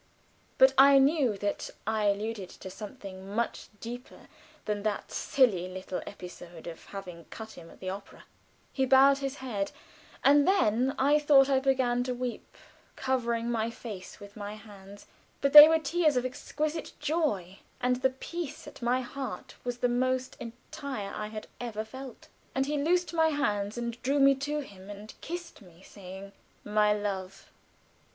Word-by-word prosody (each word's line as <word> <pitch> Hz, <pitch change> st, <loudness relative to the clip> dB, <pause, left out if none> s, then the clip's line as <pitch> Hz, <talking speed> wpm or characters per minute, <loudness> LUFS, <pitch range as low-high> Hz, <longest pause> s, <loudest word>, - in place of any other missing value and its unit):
But 265 Hz, 0 st, +7 dB
I 275 Hz, 0 st, +9 dB
knew 270 Hz, -5 st, +3 dB
that 205 Hz, 0 st, -2 dB, 0.2 s
I 215 Hz, 0 st, 0 dB
alluded 205 Hz, -1 st, -1 dB
to 190 Hz, -, -10 dB
something 200 Hz, -2 st, -9 dB
much 235 Hz, +1 st, -2 dB
deeper 245 Hz, +2 st, -9 dB, 0.4 s
than 210 Hz, -1 st, -1 dB
that 210 Hz, 0 st, -2 dB
silly 205 Hz, -10 st, +2 dB
little 185 Hz, 0 st, -5 dB
episode 175 Hz, -3 st, -10 dB
of 170 Hz, -1 st, -8 dB
having 180 Hz, -4 st, -9 dB
cut 220 Hz, -1 st, -9 dB
him 165 Hz, -1 st, -12 dB
at -, -, -14 dB
the -, -, -9 dB
theater. 195 Hz, +2 st, -7 dB, 0.5 s
He 265 Hz, -1 st, +1 dB
bowed 275 Hz, +2 st, +6 dB
his 275 Hz, 0 st, -3 dB
head; 230 Hz, -8 st, -3 dB, 0.5 s
and 285 Hz, +1 st, +6 dB
then 260 Hz, -, +3 dB
I 290 Hz, +3 st, +4 dB
thought 280 Hz, -2 st, +6 dB
I 265 Hz, -, +4 dB
began 260 Hz, -2 st, +2 dB
to 250 Hz, -1 st, -2 dB
weep, 245 Hz, -1 st, -5 dB, 0.4 s
covering 235 Hz, -3 st, -1 dB
my 225 Hz, -1 st, 0 dB
face 215 Hz, -5 st, -9 dB
with 200 Hz, 0 st, -12 dB
my 205 Hz, -1 st, -6 dB
hands; 200 Hz, -1 st, -13 dB, 0.3 s
but 280 Hz, 0 st, +1 dB
they 300 Hz, 0 st, +14 dB
were 320 Hz, -, +5 dB
tears 315 Hz, -1 st, +1 dB
of 250 Hz, -, +1 dB
exquisite 305 Hz, +5 st, -3 dB
joy, 275 Hz, -, -1 dB, 0.2 s
and 250 Hz, 0 st, +1 dB
the 265 Hz, +1 st, +2 dB
peace 300 Hz, +3 st, -6 dB
at -, -, -12 dB
my 245 Hz, +2 st, +1 dB
heart 265 Hz, +2 st, -6 dB
was 245 Hz, -1 st, -3 dB
the 245 Hz, 0 st, +2 dB
most 255 Hz, +1 st, 0 dB
entire 240 Hz, -1 st, -6 dB
I 210 Hz, -, -4 dB
had 215 Hz, 0 st, -7 dB
ever 220 Hz, -3 st, -4 dB
felt. 260 Hz, +2 st, -10 dB, 0.3 s
And 265 Hz, 0 st, +2 dB
he 295 Hz, +2 st, -1 dB
loosened 350 Hz, +3 st, +1 dB
my 320 Hz, -1 st, +4 dB
hands, 210 Hz, -9 st, -1 dB
and 235 Hz, 0 st, -4 dB
drew 275 Hz, +3 st, +1 dB
me 275 Hz, 0 st, +7 dB
to 290 Hz, +2 st, -2 dB
him 195 Hz, -7 st, -12 dB
and 205 Hz, +1 st, -9 dB
kissed 345 Hz, -4 st, -7 dB
me, 180 Hz, -2 st, -17 dB
saying 195 Hz, 0 st, -10 dB, 0.3 s
"My 210 Hz, 0 st, +3 dB
love!" 195 Hz, -2 st, -3 dB
240 Hz, 165 wpm, -29 LUFS, 205-270 Hz, 0.5 s, they